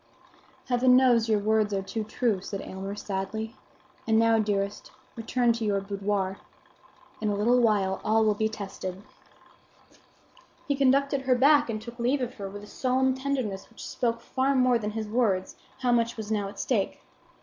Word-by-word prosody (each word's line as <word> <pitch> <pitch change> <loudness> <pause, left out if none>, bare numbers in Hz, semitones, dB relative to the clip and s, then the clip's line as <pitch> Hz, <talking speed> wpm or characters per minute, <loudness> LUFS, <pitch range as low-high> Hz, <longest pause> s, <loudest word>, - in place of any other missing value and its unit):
"Heaven 250 0 +4
knows 240 -3 +4
your 215 - +4
words 210 0 +1
are 195 - -1
too 220 +3 -4
true," 215 -2 -1
said 195 0 -5
Aylmer, 195 +1 -6
sadly. 210 +4 -4 0.5
"And 220 -1 +3
now, 225 0 +4
dearest, 205 -1 -2 0.2
return 235 +1 +1
to 230 0 -4
your 205 -2 +1
boudoir. 195 -1 -2 0.8
In 215 - 0
a 205 - 0
little 235 +5 +3
while 205 -5 +2
all 220 +1 +3
will 215 - +3
be 220 +1 0
tested." 195 -2 -6 1.6
He 285 - +1
conducted 275 +1 +2
her 260 -1 +2
back 285 +2 +5
and 215 -1 -2
took 235 +2 -10
leave 250 +4 +1
of 250 0 -3
her 195 -1 -4
with 205 +1 -9
a - - -9
solemn 260 +3 +1
tenderness 260 -7 -3
which - - -10
spoke 230 -1 -1
far 265 +3 0
more 255 -2 +4
than 210 -1 -3
his 215 0 -4
words 210 -5 0 0.3
how 250 -1 +2
much 235 -1 +1
was 220 -1 -5
now 205 -2 0
at - - -11
stake. 220 -7 -1
220 Hz, 175 wpm, -27 LUFS, 205-250 Hz, 1.6 s, back